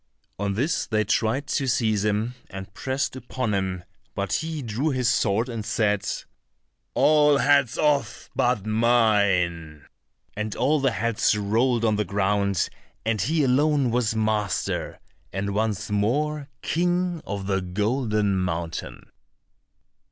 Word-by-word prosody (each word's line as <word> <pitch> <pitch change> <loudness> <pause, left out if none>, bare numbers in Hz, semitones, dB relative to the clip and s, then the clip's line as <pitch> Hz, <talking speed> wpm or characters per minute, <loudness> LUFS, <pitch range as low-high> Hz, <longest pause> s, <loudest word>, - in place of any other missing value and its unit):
On 100 -1 -1
this 145 - 0
they 110 -1 +1
tried 110 +6 0
to 135 - 0
seize 110 -5 +1
him 105 +3 0 0.2
and 95 0 -8
pressed 135 +3 -2
upon 130 -3 -3
him, 95 -2 -2 0.3
but 100 -1 -2
he 160 -2 -2
drew 120 +7 -1
his 130 -4 0
sword 110 0 +2
and 115 -3 -4
said, 105 -2 +1 0.9
"All 150 -1 +5
heads 140 -4 +3
off 140 -6 0
but 120 -5 +1
mine," 100 - +2 0.5
and 105 0 -3
all 145 +4 +2
the 135 -1 +2
heads 115 -2 +1
rolled 115 +4 +1
on 110 -2 +2
the 105 - +1
ground, 100 0 +1 0.4
and 110 -3 0
he 155 - +1
alone 140 0 +2
was 115 -2 +1
master, 110 -3 -1 0.3
and 100 +1 -2
once 110 0 -1
more 140 +8 0
King 175 0 0
of 100 -1 -4
the 95 -1 0
Golden 105 +1 0
Mountain. 85 -2 -4
110 Hz, 130 wpm, -25 LUFS, 100-130 Hz, 0.9 s, All